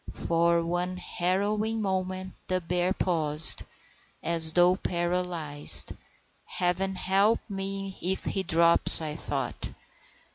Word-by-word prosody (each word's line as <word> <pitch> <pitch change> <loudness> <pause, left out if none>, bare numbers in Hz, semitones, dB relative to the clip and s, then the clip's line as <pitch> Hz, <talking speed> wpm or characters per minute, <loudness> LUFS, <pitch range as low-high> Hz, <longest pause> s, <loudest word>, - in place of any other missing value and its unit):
For 170 0 0
one 175 +2 -3
harrowing 205 +6 -2
moment 185 -2 -4
the 185 0 -1
bear 180 +1 -2
paused, 160 -5 +2 0.6
as 165 -1 +3
though 180 +1 +3
paralyzed. 175 -5 +2 0.5
Heaven 190 +2 -1
help 195 +4 +1
me 195 -1 -6
if 190 +2 -2
he 195 - -2
drops, 170 -2 +5
I 155 -2 -5
thought. - - -5
180 Hz, 105 wpm, -26 LUFS, 170-190 Hz, 0.6 s, drops